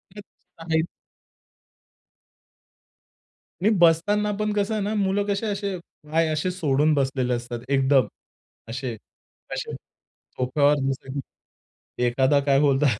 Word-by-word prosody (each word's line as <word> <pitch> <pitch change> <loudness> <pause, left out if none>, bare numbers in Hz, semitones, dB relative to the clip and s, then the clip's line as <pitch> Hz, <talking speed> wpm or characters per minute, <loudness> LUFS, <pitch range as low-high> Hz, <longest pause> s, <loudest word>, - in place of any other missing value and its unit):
तेच 205 - -9 0.4
आहे 160 -1 +1 2.8
आणि 205 - +4
बसताना 190 +6 +3
पण 210 0 0
कसं 205 +1 0
आहे 215 -2 -1
ना, 210 +2 -1
मुलं 200 0 +1
कसे 200 +2 -1
असे 200 -2 -2 0.3
पाय 165 +1 +3
असे 155 +4 0
सोडून 155 -4 +2
बसलेले 135 -3 0
असतात 120 0 -4
एकदम. 135 -3 +3 0.6
असे 125 +1 -4 0.6
असे - - -4 0.4
सोफ्यावर 140 +3 +1
बसले 135 0 -4
की 125 - -10
एखादा 130 +4 +3
काय 140 -1 +4
बोलतात 140 -4 +3
150 Hz, 115 wpm, -24 LUFS, 135-195 Hz, 2.8 s, आणि